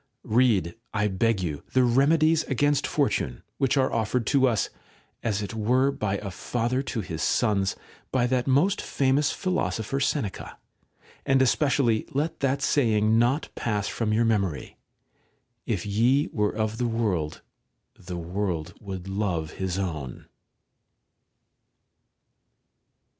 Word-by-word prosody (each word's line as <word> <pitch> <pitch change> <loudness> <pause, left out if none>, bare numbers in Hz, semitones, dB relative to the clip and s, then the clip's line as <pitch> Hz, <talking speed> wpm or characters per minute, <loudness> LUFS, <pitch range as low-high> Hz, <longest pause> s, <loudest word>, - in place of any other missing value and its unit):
Kead, 110 -8 +2 0.2
I 105 -1 +2
beg 100 +1 +1
you, 75 -4 -3
the 130 - +4
Bemedies 155 +6 +4
against 145 +2 +2
Fortune, - - -1 0.2
which 135 0 +2
are 130 -1 +2
offered 115 +1 0
to 135 -2 +3
us, 115 -4 0 0.5
as 105 -2 -1
it 100 - -5
were 125 +5 +2
by 105 -6 -2
a 100 -1 -6
father 120 +6 -1
to 120 -4 -3
his 80 -5 -5
sons, 100 -5 +1 0.4
by 125 -2 +2
that 125 +1 0
most 145 +9 +3
farnous 135 +1 +1
philosopher 140 - -1
Seneca; 135 - -2 0.7
and 135 -1 +3
especially 130 -3 +2
let 150 +4 -1
that 135 0 0
saying 110 -6 +3
not 125 +6 +1
pass 105 -3 -2
from 110 -2 -2
your 115 +2 +3
memory: 100 -10 -1 0.9
'If 105 -6 -1
ye 120 +8 +2
were 105 -2 +1
of 110 +1 -2
the 120 - +1
world, 105 -10 -1 0.5
the 90 -1 -7
world 90 -1 -3
would 95 -3 -6
love 95 -6 -2
his 95 -1 -3
own.' 80 -10 -4
115 Hz, 130 wpm, -26 LUFS, 100-130 Hz, 0.9 s, the